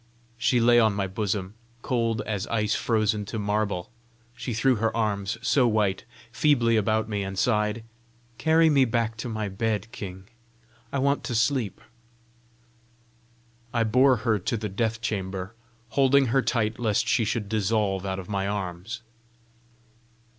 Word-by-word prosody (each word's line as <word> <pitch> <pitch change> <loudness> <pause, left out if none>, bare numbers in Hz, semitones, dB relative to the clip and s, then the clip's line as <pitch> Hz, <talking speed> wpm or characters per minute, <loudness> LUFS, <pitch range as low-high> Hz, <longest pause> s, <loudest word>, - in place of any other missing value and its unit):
She 120 +1 +3
lay 120 +1 +5
on 110 -3 +3
my 100 -1 0
bosom 95 0 -3 0.3
cold 115 -4 0
as 105 -1 -3
ice 105 -2 0
frozen 110 -2 +1
to 110 - -5
marble. 105 -3 -1 0.4
She 120 +1 -5
threw 120 +2 +2
her 115 +1 0
arms, 105 -2 -1
so 130 -1 +3
white, 105 -4 0 0.3
feebly 120 -4 +3
about 110 +1 +1
me, 105 -2 -2
and 95 0 -5
sighed 105 0 +1 0.6
"Carry 160 +1 +4
me 140 -4 +5
back 115 -1 -1
to 120 - -5
my 110 -2 -3
bed, 105 +2 -2
king. 95 -5 -8 0.6
I - - -1
want 140 +1 +1
to 120 - -3
sleep." 115 -2 0 2.0
I 115 - +3
bore 130 +4 +4
her 110 -3 +2
to 115 +5 -2
the 105 -1 -4
death 110 +3 -1
chamber, 95 -2 -3 0.4
holding 140 +1 +4
her 135 - +4
tight 110 -3 -1
lest 110 -4 +1
she 120 - +2
should 110 -1 -2
dissolve 105 -2 0
out 95 -1 -3
of 95 -2 -7
my 100 -1 -1
arms. 100 +3 -4
110 Hz, 150 wpm, -26 LUFS, 100-120 Hz, 2.0 s, lay